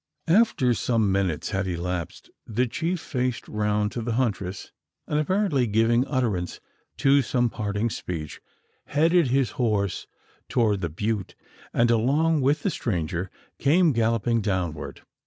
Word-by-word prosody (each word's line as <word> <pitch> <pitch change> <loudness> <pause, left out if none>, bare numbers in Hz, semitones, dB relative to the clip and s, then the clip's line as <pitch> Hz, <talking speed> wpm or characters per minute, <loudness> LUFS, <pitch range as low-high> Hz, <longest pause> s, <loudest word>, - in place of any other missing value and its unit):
After 165 - +4
some 110 -3 +1
minutes 95 -6 -1
had 95 0 -1
elapsed, 90 -2 -4 0.2
the 120 +4 +1
chief 165 +8 -2
faced 125 -4 -2
round 105 0 0
to 120 - -4
the 115 0 -2
huntress; 100 -6 -2 0.4
and, 150 - 0
apparently 160 - +1
giving 115 +4 +2
utterance 110 - -1 0.4
to 140 +1 +4
some 120 -2 0
parting 105 +2 -2
speech, 80 -7 -5 0.4
headed 165 +2 +3
his 130 0 +1
horse 105 -5 0 0.4
toward 105 -5 +1
the 85 - -1
butte, 105 +4 -3 0.4
and 120 0 +3
along 145 +7 +2
with 145 +3 +1
the 195 - +1
stranger, 90 - -2 0.3
came 160 +4 +4
galloping 115 0 +1
downward. 90 -6 -3
115 Hz, 135 wpm, -25 LUFS, 100-135 Hz, 0.4 s, After